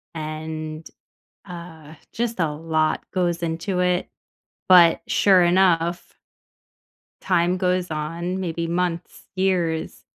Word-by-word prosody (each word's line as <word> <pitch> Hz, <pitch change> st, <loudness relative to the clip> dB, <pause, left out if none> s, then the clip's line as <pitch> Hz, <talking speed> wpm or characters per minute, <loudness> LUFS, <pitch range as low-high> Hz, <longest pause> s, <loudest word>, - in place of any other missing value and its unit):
and, 155 Hz, 0 st, -6 dB, 0.6 s
uh, 170 Hz, -4 st, -10 dB, 0.2 s
just 235 Hz, -1 st, -3 dB
a 160 Hz, -4 st, 0 dB
lot 155 Hz, 0 st, -1 dB
goes 175 Hz, -2 st, -1 dB
into 170 Hz, +3 st, -2 dB
it, 180 Hz, 0 st, +1 dB, 0.6 s
but 175 Hz, -3 st, +7 dB
sure 190 Hz, -3 st, +4 dB
enough 175 Hz, -1 st, +2 dB, 1.1 s
time 175 Hz, -1 st, +1 dB
goes 180 Hz, -1 st, 0 dB
on, 165 Hz, +4 st, -3 dB
maybe 170 Hz, -2 st, -3 dB
months, 170 Hz, 0 st, -3 dB
years, 180 Hz, -4 st, -1 dB
170 Hz, 100 wpm, -23 LUFS, 160-180 Hz, 1.1 s, but